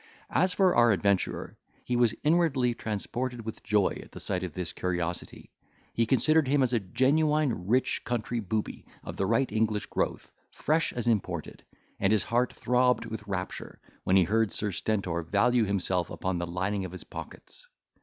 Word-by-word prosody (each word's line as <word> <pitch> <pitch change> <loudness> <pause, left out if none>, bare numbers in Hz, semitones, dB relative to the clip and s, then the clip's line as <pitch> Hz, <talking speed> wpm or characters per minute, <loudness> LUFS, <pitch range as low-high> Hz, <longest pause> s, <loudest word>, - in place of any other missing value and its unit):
As 185 0 +2
for 185 0 +3
our 120 -1 +6
adventurer, 100 -1 0 0.3
he 125 - -1
was 120 -2 +3
inwardly 150 -6 +2
transported 120 +2 -4
with 110 -1 -6
joy 105 -3 +1
at - - -11
sight 95 -2 -2
of 90 -5 -5
this 90 -2 -3
curiosity. 90 -1 -4 0.4
He 115 -1 +1
considered 155 +5 +3
him 140 0 +3
as 125 -1 +1
a 120 - +3
genuine, 140 - +1
rich 125 +5 +1
country 120 0 -2
booby, 105 +1 -3 0.2
of - - -7
the 95 - -1
right 125 +5 +1
English 110 -1 0
growth, - - -3 0.2
fresh 160 +3 0
as 120 - -3
imported; 115 -5 -1 0.4
and 95 0 +2
his 110 -3 +3
heart 120 +1 +1
throbbed 125 0 +2
with 110 -2 -7
rapture, 95 -2 -5 0.2
when 95 - +2
he 95 - +6
heard 110 +3 +1
Sir 105 -1 -1
Stentor 95 -3 -1
value 110 +7 +2
himself 95 -3 0
upon 95 -1 -2
the 85 - -3
lining 95 +3 -2
of 95 -1 -6
his 95 - -7
pockets. - - -11
110 Hz, 170 wpm, -28 LUFS, 95-125 Hz, 0.4 s, our